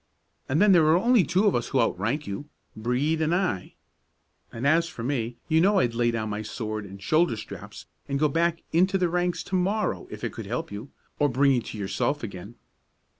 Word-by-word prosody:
And 140 +4 +2
then 205 0 +6
there 165 -4 +6
are 160 +2 +5
only 235 +1 +4
two 180 +7 +1
of 205 - +4
us 120 - -1
who 135 - 0
out 115 - +2
rank 125 +10 -1
you, 140 +10 -6 0.3
Brede 125 +8 0
and 160 +2 +2
I; 180 - -2 0.8
and 115 +3 -5
as 165 +4 +4
for 115 - -8
me, 120 -3 -2
you 160 0 +3
know 200 +3 +4
I'd 120 -10 +2
lay 120 0 +2
down 110 -2 -2
my 105 +1 -3
sword 110 -1 -5
and 100 0 -10
shoulder 155 - +2
straps 110 - -9 0.2
and 140 - 0
go 150 +2 +3
back 165 +3 0
into 190 +4 +3
the 180 -2 +1
ranks 175 0 -1
to 190 - -3
morrow 185 - 0
if - - -9
it - - -3
could - - -7
help - - -3
you, 105 +7 -7 0.3
or 145 -1 +3
bring 135 +2 +3
you 125 -3 +2
to 110 - -8
yourself 110 +8 -1
again." 100 +1 -7
140 Hz, 220 wpm, -26 LUFS, 115-175 Hz, 0.8 s, then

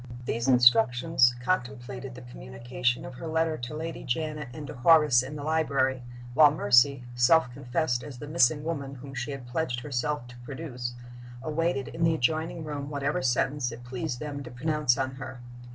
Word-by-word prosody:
These 115 +1 -2
instructions 125 +2 +5
contemplated 130 -4 -3
the 125 - -10
communication 120 - -3
of 130 - -8
her 145 +6 -7
letter 160 0 +1
to 125 +2 -6
Lady 165 +1 -5
Janet 150 +2 -3
and 150 +3 -8
to - - -7
Horace 150 -1 +5
in 135 +4 -7
the 145 - -6
library, 140 -4 +1 0.3
while 150 +2 +7
Mercy 125 0 +4
self 125 +3 +4
confessed 125 0 -1
as 140 -4 -9
the 145 - -8
missing 150 -1 +3
woman 140 -4 -4
whom 135 +1 -10
she 130 +2 -4
had 140 -3 -6
pledged 125 -1 -2
herself 140 0 -2
to 120 0 -13
produce 125 -2 -6 0.5
awaited 155 -2 -1
in 165 - -4
the 165 -1 +4
adjoining 160 +3 -1
room 145 -2 -5
whatever 145 0 -1
sentence 130 +1 0
it 120 +1 -9
pleased 125 0 -4
them 145 -2 -5
to 125 - -8
pronounce 145 +1 +1
on 130 -1 -2
her. 125 0 -8
135 Hz, 175 wpm, -28 LUFS, 125-150 Hz, 0.5 s, while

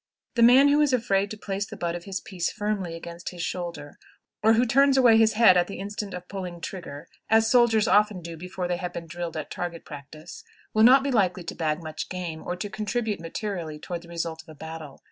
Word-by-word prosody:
The 235 - 0
man 255 +4 +7
who 295 +1 +4
is 290 -3 +2
afraid 200 -5 +1
to 215 - -7
place 200 -1 -3
the 215 - -9
butt 170 -3 -2
of 175 0 -7
his 195 -1 -4
piece 180 -3 -3
firmly 205 -5 -3
against 170 +1 -7
his 175 -2 -6
shoulder, 170 -6 -5 0.4
or 220 +1 +5
who 235 +2 +3
turns 275 +3 +4
away 245 -4 +6
his 225 0 +4
head 215 -4 +6
at 175 - +2
the 200 - -7
instant 200 0 -5
of 180 0 -8
pulling 180 -3 -6
trigger 170 -6 -7 0.2
(as 225 0 +4
soldiers 235 -4 +4
often 210 -2 +3
do 165 0 -7
before 180 +2 -5
they 175 0 -1
have 180 -1 -5
been 170 - -6
drilled 170 -1 -5
at 155 - -6
target 170 -2 -5
practice), 155 +2 -10 0.3
will 215 - +3
not 255 +4 +7
be 280 - -1
likely 185 -6 +1
to 170 - -6
bag 155 0 -2
much 155 -1 -6
game 175 -3 -5
or 180 - -4
to 180 +3 -4
contribute 215 +1 -2
materially 165 -2 -5
toward 170 +3 -6
the 170 - -15
result 165 -1 -4
of 160 - -21
a 155 - -11
battle. 160 -2 -9
185 Hz, 230 wpm, -26 LUFS, 170-215 Hz, 0.4 s, man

